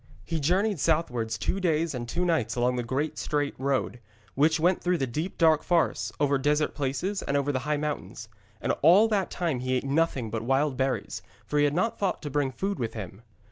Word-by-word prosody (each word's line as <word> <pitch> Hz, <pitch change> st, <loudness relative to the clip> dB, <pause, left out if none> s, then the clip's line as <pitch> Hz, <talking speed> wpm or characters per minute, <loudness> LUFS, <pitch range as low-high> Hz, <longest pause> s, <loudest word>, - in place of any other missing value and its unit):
He 165 Hz, -1 st, -2 dB
journeyed 185 Hz, +5 st, +1 dB
southwards 125 Hz, -9 st, 0 dB
two 190 Hz, -, -1 dB
days 165 Hz, -3 st, +1 dB
and 120 Hz, -2 st, -5 dB
two 175 Hz, +7 st, -1 dB
nights 165 Hz, -10 st, 0 dB
along 125 Hz, +1 st, +1 dB
the 125 Hz, -, -1 dB
great 135 Hz, +6 st, -2 dB
straight 145 Hz, -1 st, -1 dB
road, 135 Hz, -2 st, -1 dB, 0.3 s
which 155 Hz, +3 st, +3 dB
went 175 Hz, +3 st, +2 dB
through 180 Hz, 0 st, +1 dB
the 135 Hz, -, 0 dB
deep 155 Hz, +9 st, -4 dB
dark 160 Hz, -2 st, +4 dB
forests, 175 Hz, -2 st, +1 dB
over 140 Hz, -1 st, +2 dB
desert 150 Hz, +2 st, +1 dB
places 145 Hz, +9 st, -2 dB
and 140 Hz, -, -1 dB
over 140 Hz, +1 st, 0 dB
the 130 Hz, -, -1 dB
high 150 Hz, -, +2 dB
mountains. 145 Hz, -6 st, -4 dB, 0.3 s
And -, -, -1 dB
all 185 Hz, +9 st, +7 dB
that 200 Hz, -4 st, 0 dB
time 165 Hz, -8 st, -2 dB
he 130 Hz, +1 st, -1 dB
ate 130 Hz, -, 0 dB
nothing 140 Hz, -5 st, 0 dB
but 115 Hz, -1 st, -2 dB
wild 135 Hz, +4 st, +1 dB
berries, 130 Hz, +1 st, -2 dB, 0.2 s
for 150 Hz, -, 0 dB
he 145 Hz, -, +5 dB
had 145 Hz, 0 st, 0 dB
not 225 Hz, +6 st, 0 dB
thought 195 Hz, -4 st, -1 dB
to 145 Hz, -, -5 dB
bring 145 Hz, -1 st, +1 dB
food 195 Hz, +10 st, -3 dB
with 115 Hz, -2 st, -3 dB
him. 95 Hz, -1 st, -7 dB
145 Hz, 215 wpm, -27 LUFS, 130-170 Hz, 0.3 s, all